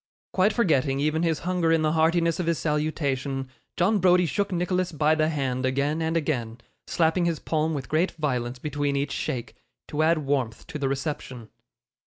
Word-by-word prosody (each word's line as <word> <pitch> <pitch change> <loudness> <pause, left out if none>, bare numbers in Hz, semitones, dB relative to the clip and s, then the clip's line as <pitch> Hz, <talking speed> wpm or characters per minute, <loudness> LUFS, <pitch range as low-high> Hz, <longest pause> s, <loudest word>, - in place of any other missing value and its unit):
Quite 190 +3 +3
forgetting 140 - +1
even 155 +2 +1
his 165 -2 0
hunger 175 -2 +1
in 165 -1 +3
the 155 - +2
heartiness 165 +1 +2
of 175 - -1
his 170 -1 +1
salutation, 140 -3 -1 0.3
John 200 +4 +3
Browdie 180 -1 +4
shook 200 +7 -1
Nicholas 180 0 0
by 155 0 +2
the 155 0 +2
hand 135 -4 -1
again 140 +4 0
and 160 +1 0
again, 120 -8 -2 0.3
slapping 170 +1 +2
his 170 -2 0
palm 155 0 -1
with 135 -4 -5
great 165 +4 +2
violence 125 -5 -2
between 145 +1 -2
each 140 0 -1
shake, 120 -4 -3 0.3
to 150 - -1
add 160 +1 +4
warmth 130 -5 -1
to 160 -4 -7
the 135 -2 0
reception. 135 -4 -4
155 Hz, 180 wpm, -26 LUFS, 140-170 Hz, 0.3 s, Browdie